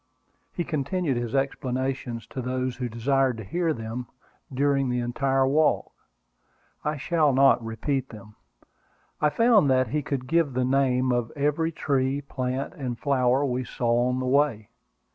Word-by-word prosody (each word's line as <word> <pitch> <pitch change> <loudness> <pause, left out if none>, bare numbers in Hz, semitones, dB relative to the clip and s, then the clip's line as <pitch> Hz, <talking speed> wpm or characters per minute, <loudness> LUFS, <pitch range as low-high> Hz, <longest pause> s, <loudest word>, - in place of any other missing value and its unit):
He 175 - -3
continued 155 -1 -1
his 120 +1 -3
explanations 130 -3 -2
to 130 - -4
those 130 0 -2
who 125 -1 -3
desired 130 +2 +1
to 110 - -6
hear 165 - -1
them 115 -1 -5 0.4
during 135 0 +1
the 125 0 0
entire 135 +2 +1
walk. 155 +3 +2 0.9
I 150 0 -1
shall 155 0 +2
not 135 -2 +4
repeat 130 +4 -2
them. 105 -1 -12 0.9
I 150 - +4
found 225 - +4
that 130 -2 +2
he 150 +5 0
could 135 -2 -3
give 160 -1 +1
the 125 0 0
name 130 -1 +2
of 120 -2 -1
every 150 +3 0
tree, 140 -3 0
plant, 130 +1 -3
and 130 -8 -4
flower 130 0 +2
we 130 -1 -1
saw 120 0 0
on 125 - -1
the 130 - -2
way. 130 -5 +1
130 Hz, 155 wpm, -26 LUFS, 125-145 Hz, 0.9 s, not